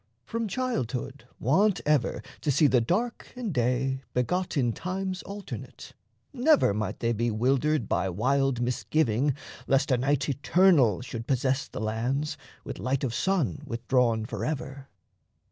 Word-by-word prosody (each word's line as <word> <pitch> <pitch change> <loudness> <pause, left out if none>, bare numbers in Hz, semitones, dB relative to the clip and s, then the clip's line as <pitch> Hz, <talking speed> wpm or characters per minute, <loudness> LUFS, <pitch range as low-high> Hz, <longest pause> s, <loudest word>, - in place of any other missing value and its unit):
From 230 - -2
childhood 135 - -3
wont 190 - +3
Ever 150 -4 +1 0.2
to 150 - -2
see 145 +3 +4
the 130 -4 +4
dark 220 - -1
and 235 -7 -3
day 130 +1 0
begot 180 +8 0
In 120 -4 +2
times 185 - -3
alternate, 200 0 -8 0.4
never 275 - +4
might 110 +1 -3
they 115 0 +1
be 115 +2 0
Wildered 130 +3 +1
by 95 - 0
wild 130 +6 +1
misgiving, 125 +1 +1 0.3
lest 135 +1 +2
a 125 - +3
night 145 +2 +1
Eternal 145 - +4
should 115 -2 -6
possess 130 +1 +1
the - - -7
lands, 120 +7 -1 0.3
with - - -7
light 130 +7 -1
Of 125 -4 -1
sun 150 +2 0
withdrawn 115 -1 +1
forever. 135 +1 -4
135 Hz, 140 wpm, -27 LUFS, 120-160 Hz, 0.4 s, see